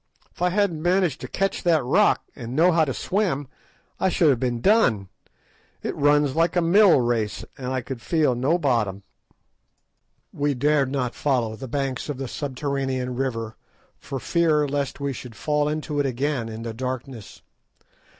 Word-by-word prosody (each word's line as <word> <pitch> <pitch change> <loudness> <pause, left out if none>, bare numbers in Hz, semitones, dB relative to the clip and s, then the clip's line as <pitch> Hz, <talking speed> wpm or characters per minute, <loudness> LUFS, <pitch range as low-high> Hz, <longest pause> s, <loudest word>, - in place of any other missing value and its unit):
If - - -18
I 180 - +3
hadn't 180 -4 0
managed 175 -3 +1
to - - -5
catch 195 +1 -1
that 165 -6 +2
rock, 210 +12 +3
and 120 -1 -7
known 170 +4 +4
how 160 -1 +4
to 135 - -2
swim, 175 - -1 0.5
I 190 - +2
should 170 -3 +3
have 125 - 0
been 120 -2 -1
done. 115 - +3 0.7
It - - -3
runs 145 -1 +3
like 165 +2 +2
a 175 - +3
mill 185 -1 +6
race, 115 -3 -1
and 130 -2 -7
I 130 0 -1
could 125 0 -7
feel 150 +4 +2
no 135 +8 +1
bottom." 115 - 0 1.3
We 145 -1 0
dared 140 0 +2
not 125 -4 -1
follow 120 -6 0
the 130 +4 -8
banks 135 +1 -3
of 145 - -3
the 135 -1 -4
subterranean 135 -2 -3
river 115 -4 -3 0.4
for 135 -1 -5
fear 155 -1 +2
lest 140 -1 -2
we 140 -1 -2
should 120 -2 -9
fall 150 +4 0
into 150 -1 -3
it 140 - +2
again 130 -2 -2
in 110 +1 -7
the 115 -1 -5
darkness. 125 -2 -6
140 Hz, 170 wpm, -24 LUFS, 125-155 Hz, 1.3 s, mill